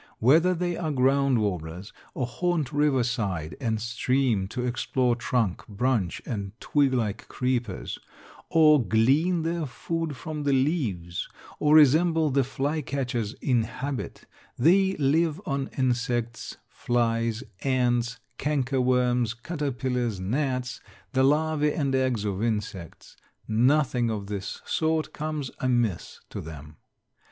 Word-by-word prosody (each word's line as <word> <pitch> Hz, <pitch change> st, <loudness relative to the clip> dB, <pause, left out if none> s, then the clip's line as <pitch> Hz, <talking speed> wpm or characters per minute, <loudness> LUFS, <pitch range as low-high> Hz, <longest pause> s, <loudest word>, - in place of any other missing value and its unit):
Whether 165 Hz, +10 st, +4 dB
they 175 Hz, 0 st, -1 dB
are 165 Hz, -3 st, -2 dB
ground 135 Hz, -1 st, +3 dB
warblers 90 Hz, -1 st, -4 dB, 0.2 s
or 130 Hz, -, -1 dB
haunt 155 Hz, +3 st, -1 dB
river 145 Hz, -3 st, +3 dB
side 100 Hz, -10 st, -2 dB
and 110 Hz, -3 st, 0 dB
stream 115 Hz, -2 st, 0 dB
or 125 Hz, -, 0 dB
explore 125 Hz, 0 st, 0 dB
trunk, 120 Hz, -5 st, 0 dB
branch, 110 Hz, -4 st, -1 dB
and 100 Hz, -2 st, -5 dB
twig 145 Hz, -2 st, +2 dB
like 110 Hz, -5 st, -2 dB
creepers, 125 Hz, -6 st, -2 dB, 0.5 s
or 150 Hz, -4 st, +5 dB
glean 145 Hz, +11 st, +2 dB
their 165 Hz, -1 st, -1 dB
food 165 Hz, +2 st, -4 dB
from 155 Hz, 0 st, -5 dB
the 145 Hz, -1 st, +1 dB
leaves, 120 Hz, -, -1 dB, 0.3 s
or 150 Hz, +1 st, +4 dB
resemble 155 Hz, +1 st, +5 dB
the 135 Hz, +1 st, +3 dB
flycatchers 135 Hz, -4 st, -2 dB
in 125 Hz, -4 st, +2 dB
habit, 130 Hz, +4 st, -5 dB, 0.3 s
they 190 Hz, +7 st, +4 dB
live 155 Hz, +3 st, +2 dB
on 140 Hz, -5 st, -2 dB
insects, 120 Hz, -2 st, -1 dB
flies, 115 Hz, -1 st, 0 dB, 0.2 s
ants, 125 Hz, -2 st, +1 dB, 0.2 s
canker 135 Hz, -3 st, 0 dB
worms, 125 Hz, -2 st, +2 dB
caterpillars, 125 Hz, -, -2 dB
gnats, 125 Hz, +4 st, -2 dB, 0.3 s
the 130 Hz, -, +3 dB
larvæ 150 Hz, +2 st, +2 dB
and 140 Hz, -4 st, 0 dB
eggs 130 Hz, -5 st, +1 dB
of 100 Hz, -1 st, -2 dB
insects; 105 Hz, -7 st, -4 dB, 0.3 s
nothing 125 Hz, +1 st, +2 dB
of 105 Hz, -3 st, -3 dB
this 100 Hz, -1 st, -5 dB
sort 160 Hz, 0 st, 0 dB
comes 150 Hz, -3 st, -4 dB
amiss 120 Hz, -8 st, -1 dB
to -, -, -5 dB
them. 75 Hz, -1 st, -10 dB
125 Hz, 125 wpm, -26 LUFS, 115-150 Hz, 0.5 s, or